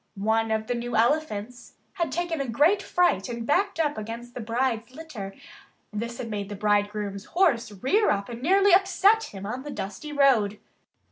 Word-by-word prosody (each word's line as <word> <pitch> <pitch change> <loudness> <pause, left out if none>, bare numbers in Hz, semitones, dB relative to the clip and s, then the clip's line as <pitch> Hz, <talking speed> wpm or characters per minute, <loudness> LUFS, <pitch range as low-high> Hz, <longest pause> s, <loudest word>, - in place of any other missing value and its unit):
One 220 +3 +1
of 220 0 0
the 245 - -1
new 240 0 -4
elephants 240 -2 0 0.2
had 340 -7 -2
taken 335 -1 -2
a 275 - -3
great 305 - +3
fright 355 - +1
and 235 -1 -4
backed 375 - +1
up 295 -6 0
against 230 +3 -7
the - - -6
bride's 230 +1 -1
litter. 240 -12 -8 0.6
This 235 +3 -4
had 240 - -5
made 205 -1 -4
the 205 - -5
bridegroom's 205 -1 -1
horse 300 - +1
rear 265 - +1
up 200 0 0
and 235 0 -8
nearly 390 +6 +4
upset 395 +3 +4
him 195 -1 -9
on 245 +5 -4
the 295 - -8
dusty 285 +5 -6
road. 250 -8 +3
240 Hz, 180 wpm, -26 LUFS, 210-315 Hz, 0.6 s, nearly